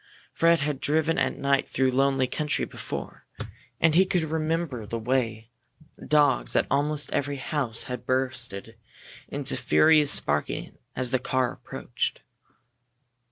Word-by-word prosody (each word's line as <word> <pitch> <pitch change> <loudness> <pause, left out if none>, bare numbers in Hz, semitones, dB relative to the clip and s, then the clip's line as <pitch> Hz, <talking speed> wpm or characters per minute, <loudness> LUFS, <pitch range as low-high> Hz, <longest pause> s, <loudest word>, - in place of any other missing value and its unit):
Fred 165 -1 +3
had 145 -2 -1
driven 155 +3 +1
at - - 0
night 140 0 +1
through 130 0 +1
lonely 135 0 +2
country 150 +4 -1
before, - - -7 0.5
and 160 -1 +4
he 180 +4 +6
could 180 -3 0
remember 160 -5 -2
the 115 - -3
way 115 -1 -1 0.6
dogs 145 -4 +3
at - - +3
almost 145 +1 0
every 145 0 -1
house 135 -5 -3
had 125 -1 -7
burst 130 -2 -1 0.8
into 140 -1 -1
furious 150 +4 +4
barking 75 0 -3 0.2
as 125 -1 0
the 130 - +2
car 130 -1 0
approached. - - -4
140 Hz, 130 wpm, -26 LUFS, 125-155 Hz, 0.8 s, he